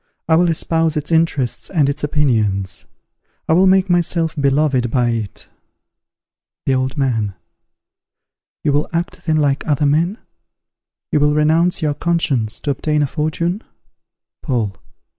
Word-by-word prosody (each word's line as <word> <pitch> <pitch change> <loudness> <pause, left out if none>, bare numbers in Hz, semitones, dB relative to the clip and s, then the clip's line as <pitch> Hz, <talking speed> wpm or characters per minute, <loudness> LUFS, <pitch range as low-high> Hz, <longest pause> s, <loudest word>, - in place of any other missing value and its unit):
I 160 - +3
will 175 +1 +3
espouse 165 -1 0
its 150 +2 -4
interests 160 -6 0
and 155 -7 +2
its 140 +1 -3
opinions: 110 -11 0 0.6
I - - +3
will 185 +3 +5
make 190 0 +4
myself 170 -2 +1
beloved 140 -3 +1
by 120 0 +1
it. 110 -5 -4 1.2
The 135 - +2
Old 130 +1 -1
Man. 115 -8 0 1.3
You 145 - +1
will 145 +1 0
act 170 0 -3
then 155 -1 +2
like 145 -2 +1
other 145 -1 +1
men? 165 +8 +1 0.9
you 150 - +3
will 150 0 +3
renounce 160 +3 +2
your 150 -1 +1
conscience 145 -9 0
to 145 - -1
obtain 150 +2 0
a - - +2
fortune? 165 - -2 0.8
_Paul. 115 - -1
150 Hz, 140 wpm, -18 LUFS, 130-165 Hz, 1.3 s, will